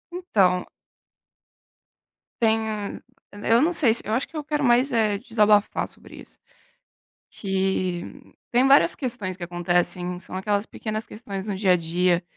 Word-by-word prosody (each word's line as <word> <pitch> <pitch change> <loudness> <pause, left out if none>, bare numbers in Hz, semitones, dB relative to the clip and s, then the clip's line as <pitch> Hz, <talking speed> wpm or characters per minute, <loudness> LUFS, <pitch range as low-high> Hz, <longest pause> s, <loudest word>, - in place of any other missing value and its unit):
Então 195 - +1 1.8
tem 220 -2 -1 0.3
eu 225 +3 +1
não 350 +3 +1
sei 250 -9 +4
se - - +7
eu 215 - -2
acho 250 +4 0
que 320 - -10
eu 300 - -4
quero 295 0 -2
mais, 250 +2 +3
eh, 215 -3 +1
desabafar 210 -2 +2
sobre - - -13
isso. - - -15 0.9
Que 190 -2 -2 0.5
têm 250 +2 +3
várias 280 +5 +5
questões 220 -9 -4
que 180 - -8
acontecem. 175 +1 -1
São 185 - -9
aquelas 200 +2 -1
pequenas 215 -1 -5
questões 200 -3 -7
no 205 -2 -3
dia-a-dia. 180 -2 +1
210 Hz, 135 wpm, -24 LUFS, 185-235 Hz, 1.8 s, se